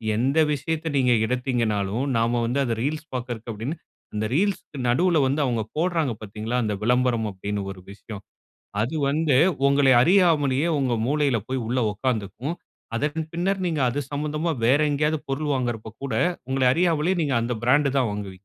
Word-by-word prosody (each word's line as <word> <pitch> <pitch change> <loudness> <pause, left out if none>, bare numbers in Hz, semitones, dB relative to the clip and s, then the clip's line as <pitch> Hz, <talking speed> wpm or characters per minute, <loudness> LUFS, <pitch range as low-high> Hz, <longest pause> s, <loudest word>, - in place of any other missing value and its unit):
எந்த 135 +7 +1 0.2
விஷயத்த 160 +2 -3
நீங்க 125 -2 +3
எடுத்தீங்கனாலும் 115 -3 -1
நாம 120 +1 +1
வந்து 125 +4 0
அத 115 - 0
ரீல்ஸ் 155 +3 -3
பாக்ரக்கு 120 -2 -5
அப்டின்னு 115 +10 -4 0.4
அந்த 110 +1 -1
ரீல்ஸ்க்கு 190 -2 -1
நடுல 170 +7 +3
வந்து 140 +3 0
அவங்க 120 -3 0
போடுறாங்க 165 -4 0
பார்த்தீங்களா? 110 +3 -4
அந்த 105 -1 -1
விளம்பரம் 125 -1 +2
அப்டின்னு 100 +1 -4
ஒரு 95 - -10
விஷயம். 100 0 -9 0.6
அது 125 +8 -2
வந்து 150 -2 +2 0.3
உங்களை 140 -1 +4
அறியாமலே 160 -4 +3
உங்க 130 -3 +1
மூளையில 145 -4 +1
போய் 130 -2 -2
உள்ள 125 +2 0
உட்கார்ந்துக்கும். 115 - -3 0.4
அதன் 155 +3 -2
பின்னர் 190 +3 0
நீங்க 160 -5 0
அது 135 +4 -2
சம்பந்தமா 150 +3 -1
வேற 135 +5 +4
எங்கேயாவது 150 +1 +1
பொருள் 145 +2 -1
வாங்குறப்ப 120 -4 -3
கூட 135 -5 -3 0.4
உங்கள 130 0 0
அறியாமலேயே 170 +1 +1
நீங்க 140 -4 0
அந்த 120 +1 -2
பிராண்ட் 140 +3 +4
தான் 125 -4 +1
வாங்குவீங்க. 100 -2 -6
130 Hz, 155 wpm, -24 LUFS, 115-155 Hz, 0.6 s, உங்களை